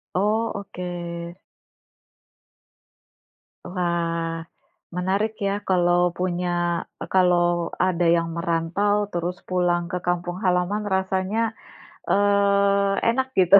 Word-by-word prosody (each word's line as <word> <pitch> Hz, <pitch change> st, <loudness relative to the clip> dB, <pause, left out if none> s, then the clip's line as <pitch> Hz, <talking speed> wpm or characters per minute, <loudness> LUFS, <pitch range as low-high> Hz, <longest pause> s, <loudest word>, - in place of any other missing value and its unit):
Oh, 215 Hz, +4 st, +1 dB
oke. 175 Hz, -2 st, -6 dB, 2.2 s
Wah, 170 Hz, -2 st, -1 dB, 0.5 s
menarik 195 Hz, +4 st, 0 dB
ya, 195 Hz, -, +1 dB, 0.2 s
kalau 175 Hz, -1 st, +3 dB
punya, 180 Hz, 0 st, -1 dB, 0.5 s
e -, -, -3 dB
kalau 175 Hz, -2 st, +3 dB, 0.2 s
ada 175 Hz, -1 st, +1 dB
yang 170 Hz, 0 st, 0 dB
merantau, 170 Hz, +4 st, +1 dB, 0.2 s
terus 175 Hz, +1 st, -2 dB
pulang 175 Hz, -1 st, +2 dB
ke 180 Hz, -, -1 dB
kampung 175 Hz, 0 st, -1 dB
halaman 180 Hz, +3 st, +1 dB
rasanya, 190 Hz, +4 st, 0 dB, 0.5 s
eee, 200 Hz, 0 st, +3 dB, 0.2 s
enak 260 Hz, +2 st, 0 dB
gitu. 190 Hz, +2 st, +8 dB
180 Hz, 95 wpm, -24 LUFS, 175-200 Hz, 2.2 s, gitu